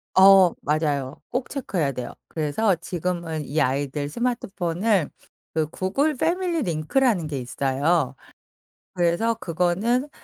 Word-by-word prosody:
어 190 -2 +8
맞아요. 145 -3 -1
꼭 250 0 -2
체크해야 185 - -1
돼요. 125 -2 -5 0.2
그래서 165 +6 +1
지금은 170 -3 -3
이 155 +3 0
아이들 145 +2 -1
스마트폰을 195 - 0 0.4
그 160 -1 +1
구글 265 - 0
패밀리 340 +2 0
링크라는 175 - +1
게 140 -3 -3
있어요. 135 +3 0 0.8
그래서 180 +6 +1
그거는 200 - 0
175 Hz, 270 characters per minute, -24 LUFS, 150-225 Hz, 0.8 s, 어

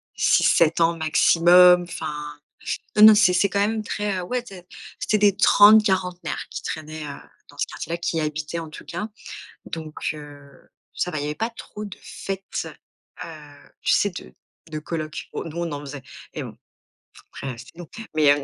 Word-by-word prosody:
6-7 165 0 +3
ans 165 0 +3
maximum. 175 +3 +6
Enfin, 150 -3 -6 0.6
non, 210 - +8
non, 220 0 +11
c'est 205 -4 +5
c'est 190 +3 +3
quand 200 - -1
même 215 +2 0
très, 205 -2 -2
heu, - - -3
ouais 250 +6 -2
té 190 -7 -12 0.3
c'est 215 - +1
des 205 -1 +4
trente-quarantenaires 195 -4 +4
qui - - -5
traînaient, 155 0 -6
heu, 140 - -7 0.3
dans - - -17
ce - - 0
quartier-là, 170 +2 -5
qui 170 -1 -2
y - - +1
habitaient 155 +1 -3
en 165 -1 -6
tout - - -11
cas. 210 - -5 0.6
Donc, 160 -2 -7 0.2
heu, 145 -2 -13 0.3
ça 180 - -2
va, 155 - -5
il - - -3
y - - -3
avait 150 - -3
pas 225 +7 -2
trop 215 -2 -9
de 200 -1 -9
fêtes, 195 0 -5 0.6
heu, - - -9 0.5
tu - - +2
sais, 205 - +2
de 180 - -10 0.4
de 155 - -4
collocs. 155 0 -5
Oh, - - -4
nous 165 0 -8
on 170 -2 -2
en 145 - -4
faisait 145 -1 -8 0.3
et - - -4
bon, - - -10 0.7
après, 135 - -6
heu, - - -12
c'était 120 +8 -14
nous. 175 - -8 0.3
Mais, 150 -2 +5
heu, 145 -1 -3
170 Hz, 190 wpm, -23 LUFS, 155-195 Hz, 0.7 s, non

